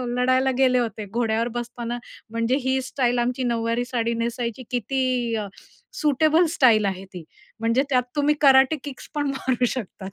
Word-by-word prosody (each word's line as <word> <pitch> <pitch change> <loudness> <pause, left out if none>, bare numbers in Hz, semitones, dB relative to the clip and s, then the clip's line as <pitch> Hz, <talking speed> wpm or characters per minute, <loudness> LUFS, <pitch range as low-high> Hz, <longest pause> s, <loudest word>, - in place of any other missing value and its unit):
लढायला 255 +1 +2
गेले 255 -1 +4
होते. 220 -3 -3
घोड्यावर 230 0 0
बसताना 240 0 -5 0.3
म्हणजे 230 +2 0
ही 260 0 +2
स्टाईल 245 -2 0
आमची 250 +2 -1
नऊवारी 235 0 0
साडी 235 -2 -1
नेसायची 235 +1 -3
किती 250 +2 -1 0.3
अ, 210 -2 -3 0.5
सुटेबल 310 +3 +3
स्टाईल 220 -6 +5
आहे 190 0 -3
ती. 175 -3 -8 0.4
म्हणजे 230 +4 +2
त्यात 250 -1 +3
तुम्ही 295 0 +2
कराटे 270 +2 +6
किक्स 280 -3 -9
पण 290 -1 0
मारू 260 -2 0
शकतात. 205 -5 -5
245 Hz, 155 wpm, -23 LUFS, 230-265 Hz, 0.5 s, कराटे